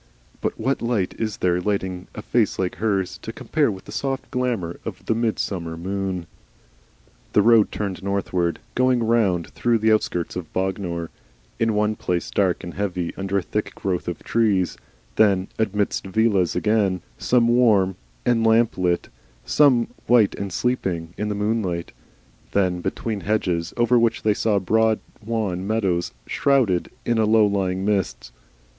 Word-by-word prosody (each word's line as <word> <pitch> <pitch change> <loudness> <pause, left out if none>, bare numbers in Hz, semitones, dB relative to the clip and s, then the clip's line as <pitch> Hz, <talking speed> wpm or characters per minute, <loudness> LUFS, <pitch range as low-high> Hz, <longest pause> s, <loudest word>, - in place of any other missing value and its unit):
But - - -2
what 130 +5 0
light 115 -6 0
is 110 -2 -2
there 90 -1 +1
lighting 95 -2 -2
a 105 - -6
face 115 -3 +1
like 95 -1 -2
hers, 95 -3 -1
to 110 - -6
compare 150 +4 0
with 95 -3 -6
the - - -10
soft 135 -1 -3
glamour 120 -10 -2
of - - -7
the - - +2
midsummer 100 -7 -2
moon? 95 0 -3 1.1
The 105 - +5
road 115 -1 +5
turned 100 -3 -3
northward, 95 -3 -1 0.2
going 130 -1 +2
round 105 -7 +1
through 120 -1 +1
the 110 0 +2
outskirts 90 -5 0
of 90 -4 -6
Bognor, 90 -3 -2 0.5
in 115 -2 +1
one 105 +1 +1
place 90 -4 -2
dark 95 -3 +1
and 85 - -6
heavy 90 -3 -2
under 95 0 -1
a 95 - 0
thick 105 +4 -3
growth 90 -3 -2
of 85 -2 -4
trees, 105 -6 +1 0.4
then 100 -3 +3
amidst 105 -2 0
villas 100 -3 +2
again, 100 -1 +1 0.2
some 120 -2 +3
warm 110 -6 +4 0.3
and 120 -2 +3
lamplit, 110 -6 +2 0.4
some 130 -6 +4 0.2
white 120 -4 +5
and 100 -1 -5
sleeping 90 -8 -1
in 105 0 -2
the 105 - -2
moonlight; 105 -5 -1 0.6
then 90 -3 +1
between 110 +3 -3
hedges, 90 -4 0
over 120 0 +4
which 115 -1 +1
they 110 - +3
saw 105 0 +1
broad 110 +3 +2 0.2
wan 100 -5 -2
meadows 95 - 0
shrouded 125 -11 +2 0.2
in 120 -1 +1
a 110 - +4
low 110 0 +5
lying 95 -2 0
mist. 100 -10 -1
100 Hz, 155 wpm, -23 LUFS, 90-115 Hz, 1.1 s, The